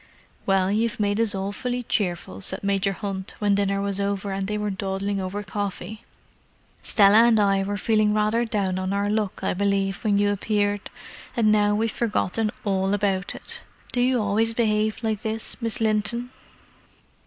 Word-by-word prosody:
"Well, 195 -1 +3
you've 220 +2 0
made 205 0 +1
us 220 -3 +2
awfully 245 +6 -3
cheerful," 175 - -2
said 190 - 0
Major 195 0 +1
Hunt, 195 -1 -5
when 205 -1 +2
dinner 200 0 +1
was 200 -1 -1
over, 200 0 -1
and 195 0 -2
they 210 0 -2
were 210 -1 -2
dawdling 195 +1 -2
over 195 +2 -4
coffee. 205 +1 -5 0.8
"Stella 210 +2 +5
and 230 -2 +4
I 195 -1 +3
were 205 +1 -2
feeling 215 0 +2
rather 215 +2 +2
down 200 -5 -1
on 185 +1 -2
our 200 +1 0
luck, 210 -3 -1
I - - +1
believe, 195 +1 0
when 205 -3 +2
you 205 0 +3
appeared, 205 0 -1 0.5
and 215 -2 +4
now 210 -1 +3
we've 225 +1 0
forgotten 220 -1 0 0.2
all 195 0 +1
about 195 -2 -1
it. - - -6 0.3
Do 245 - 0
you 250 0 +3
always 220 +2 +1
behave 215 -2 +1
like 220 -2 -1
this, 220 0 -3
Miss 230 -1 -1
Linton?" 225 +3 0
205 Hz, 170 wpm, -24 LUFS, 195-215 Hz, 0.8 s, Stella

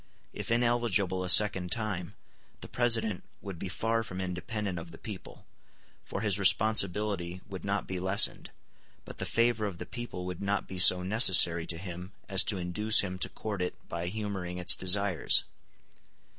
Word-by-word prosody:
If - - -7
ineligible 115 -6 0
a 90 - -3
second 95 -2 +4
time, 100 -7 -5 0.5
the - - -8
President 115 -5 +1 0.2
would 95 -4 -9
be 95 - -6
far 115 +4 -2
from 95 -4 -8
independent 95 +1 -5
of 85 0 -11
the 80 - -13
people, 105 -4 -11 0.6
for 100 - -6
his 105 -3 +1
responsibility 100 -3 +1
would 95 -2 -9
not 100 0 -3
be 95 -1 -6
lessened; 95 +4 +3 0.6
but - - -12
the - - -4
favor 115 -2 0
of 95 -4 -8
the - - -8
people 120 -7 -8
would 90 -1 -7
not 100 0 -3
be 95 - -8
so 90 0 +6
necessary 90 -5 +5
to 85 - -5
him 90 +1 -9
as 95 -1 +3
to 105 - -1
induce 100 +5 +2
him 95 -2 -6
to - - +1
court 105 -4 -7
it 90 - -4
by 85 0 -6
humoring 95 -3 -6
its 90 - +5
desires. 95 -2 +2
95 Hz, 170 wpm, -28 LUFS, 90-105 Hz, 0.6 s, so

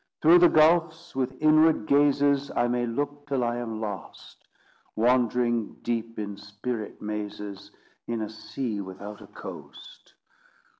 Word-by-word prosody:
Through 170 +3 +8
the 175 -1 +7
gulfs, 160 +1 +3
with 130 0 -2
inward 155 -4 +4
gazes, 140 0 +3
I 120 - +2
may 120 0 0
look 145 +4 -3
till 135 -3 0
I 120 0 -1
am 115 -2 -4
lost; 105 -4 -8 0.5
Wandering 120 -1 +1
deep 115 -1 -3
in 100 -2 -5
spirit 105 +2 -6
mazes, 105 -1 -6 0.4
In 115 -2 -2
a 105 - -5
sea 110 -1 -4
without 100 +2 -9
a - - -12
coast. - - -11
120 Hz, 135 wpm, -26 LUFS, 105-145 Hz, 0.5 s, Through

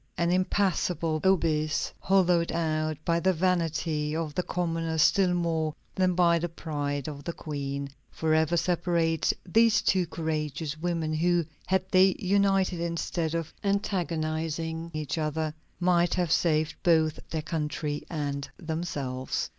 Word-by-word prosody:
An 170 0 +1
impassable 180 -3 +1
abyss, 160 -5 +1
hollowed 180 -3 +3
out 155 -2 -1
by 170 0 +2
the 190 +2 +2
vanity 165 -3 0
of 160 -2 -2
the 180 - 0
commoner 165 -2 -2
still 180 +4 +4
more 160 -3 0 0.2
than 185 -1 +1
by 170 -1 +4
the 175 +1 -2
pride 145 -4 -3
of 145 -2 -6
the 170 - -4
Queen, 140 -3 -4 0.2
forever 160 +1 +1
separates 170 -2 +1
these 225 +4 +4
two 185 -2 +2
courageous 155 -2 -3
women 165 -1 -2
who, 170 +1 +2 0.2
had 190 0 +1
they 190 0 +5
united 195 -2 +2
instead 170 -1 -2
of 165 -1 -3
antagonizing 165 -4 -1
each 155 -1 -3
other, 155 0 -1 0.3
might 175 -1 +3
have 175 -3 0
saved 155 -2 +2
both 160 -3 +3
their 160 -1 -3
country 150 -2 -2
and 145 -4 -3
themselves. 155 -7 -3
165 Hz, 130 wpm, -28 LUFS, 155-175 Hz, 0.3 s, they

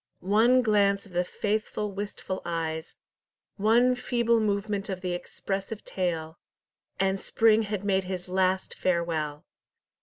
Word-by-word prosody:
One 245 +4 +5
glance 200 -3 +3
of 200 - -16
the 175 0 +1
faithful 210 +2 -2
wistful 200 -1 -5
eyes, 165 -1 -3 0.6
one 235 +5 +4
feeble 235 -2 +1
movement 205 -1 -1
of 185 -1 -4
the 180 -1 -2
expressive 195 +4 -4
tail, 165 -3 -3 0.6
and 195 0 +1
Spring 225 +2 +3
had 210 -2 -3
made 190 -2 +1
his 185 -1 -4
last 185 0 +1
farewell! 165 -4 -1
195 Hz, 125 wpm, -27 LUFS, 180-215 Hz, 0.6 s, One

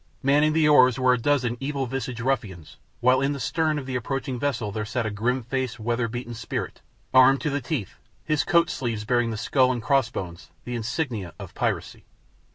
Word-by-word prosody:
Manning 145 +3 +4
the 160 -1 +3
oars 130 -5 +6
were 130 -1 +4
a - - +2
dozen 125 -2 +1
evil 140 0 -2
visaged 125 -1 -4
ruffians, 105 - -3 0.2
while 130 +2 +4
in 140 +1 +1
the 140 - -5
stern 155 +4 0
of 140 - -5
the 130 -1 -4
approaching 130 +1 -3
vessel 130 -7 -1
there 105 +1 -3
sat 115 +2 -2
a 110 - -2
grim 120 +5 -1
faced, 130 0 -3
weather 115 +1 -1
beaten 120 +1 -6
spirit, 115 - -5 0.3
armed 130 +1 +7
to 150 - -1
the 145 0 -1
teeth, 125 - -4 0.3
his 155 -2 +1
coat 170 0 +3
sleeves 115 -4 -3
bearing 120 +1 +1
the 110 - -3
skull 130 +3 +2
and 120 -3 -3
cross 135 -2 +2
bones, 90 -7 -7 0.2
the 125 - -5
insignia 115 - -3
of - - -9
piracy. - - -2
125 Hz, 200 wpm, -25 LUFS, 115-135 Hz, 0.3 s, armed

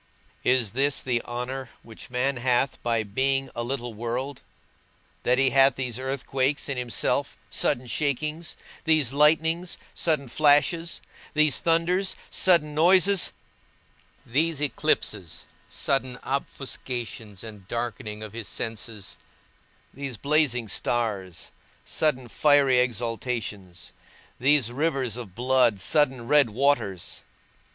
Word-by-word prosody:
Is 125 -5 +2
this 135 +3 +1
the 120 -2 0
honour 125 +2 -5
which 115 +2 -12
man 125 +2 0
hath 125 +2 +1
by 115 -2 0
being 135 +6 0
a 120 - -3
little 120 -1 -3
world, 120 +5 -4 0.8
that 125 +1 +2
he 135 -1 +4
hath 135 0 +5
these 125 -3 -3
earthquakes 135 +1 -1
in 140 - -2
himself, 125 -3 -1
sudden 125 - +1
shakings; 150 +5 -2 0.3
these 155 -6 +3
lightnings, 160 +4 +2 0.2
sudden 155 -5 +1
flashes; 155 +5 +3 0.3
these 155 -2 +4
thunders, 175 +3 +1 0.2
sudden 165 -5 +3
noises; 185 +5 +4 0.9
these 155 +5 +1
eclipses, 110 - -1 0.2
sudden 130 -2 0
offuscations 120 -6 -4
and 105 -4 -11
darkening 110 -2 -4
of 110 -1 -8
his 115 -3 -5
senses; 110 0 -4 0.8
these 135 -3 -6
blazing 140 -4 +1
stars, 100 -7 -2 0.3
sudden 130 -5 0
fiery 140 0 +4
exhalations; 115 -6 -3 0.5
these 130 -2 +3
rivers 135 -4 -1
of 115 -7 -8
blood, 125 -3 +3
sudden 130 +1 +1
red 145 -3 +5
waters? 110 -7 0
130 Hz, 110 wpm, -26 LUFS, 115-145 Hz, 0.9 s, hath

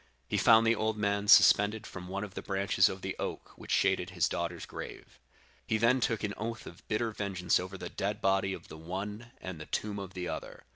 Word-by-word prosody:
He - - -2
found 115 0 +6
the 115 - +5
old 110 -1 -1
man 100 0 0
suspended 105 +2 +6
from 90 -1 -8
one 100 +2 -3
of 100 -2 -7
the - - -5
branches 95 -1 +2
of 95 0 -7
the 95 - -3
oak - - -5
which - - -13
shaded 95 -2 +2
his 90 -3 +1
daughter's 85 0 -3
grave. - - -9 0.5
He 110 - +2
then 115 +4 +4
took 115 -3 0
an 105 -1 -1
oath 115 +1 -4
of - - -12
bitter 110 +1 0
vengeance 95 -4 0
over 95 +2 -6
the - - -6
dead 100 +2 -2
body 95 0 +2
of - - -7
the 80 - -10
one 100 +7 -5
and 90 -4 -7
the 80 - -8
tomb 105 -1 -2
of 95 -1 -8
the 90 -1 -3
other. - - -6
100 Hz, 225 wpm, -31 LUFS, 95-110 Hz, 0.5 s, found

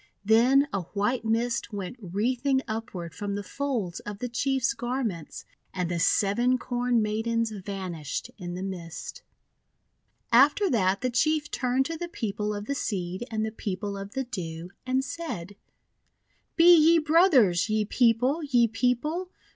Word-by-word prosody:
Then 250 +6 +5
a 195 - 0
white 205 +8 -1
mist 230 +1 0
went 200 +1 -5
wreathing 250 +8 0
upward 215 -7 -5
from 205 +2 -4
the 205 - -4
folds 230 -7 -3
of 205 -1 -7
the 245 - -3
Chief's 265 +1 0
garments, 240 - -4 0.3
and 180 -2 -1
the 170 - -1
Seven 235 +8 +2
Corn 245 -2 0
Maidens 225 +1 -1
vanished 185 -7 -5
in 175 -1 -5
the 185 - -5
mist. 180 -4 -7 1.1
After 290 - +5
that 195 -3 +2
the 255 0 0
Chief 300 +4 +1
turned 255 +1 +1
to 330 +3 -4
the 345 - -4
People 210 -8 -3
of 205 0 -5
the 280 - -2
Seed 190 -4 -3
and 220 -1 -1
the 220 - -4
People 200 -1 -4
of 195 +1 -7
the 265 - 0
Dew, 175 -8 -6 0.2
and 260 +1 +1
said: 205 - -6 0.5
— - - -44
"Be 345 +1 +8
ye 330 +1 +6
brothers, 300 - +4
ye 215 0 +1
People! 245 +7 +2
ye 245 -6 +3
People! 250 - -1
230 Hz, 155 wpm, -27 LUFS, 195-260 Hz, 1.1 s, Be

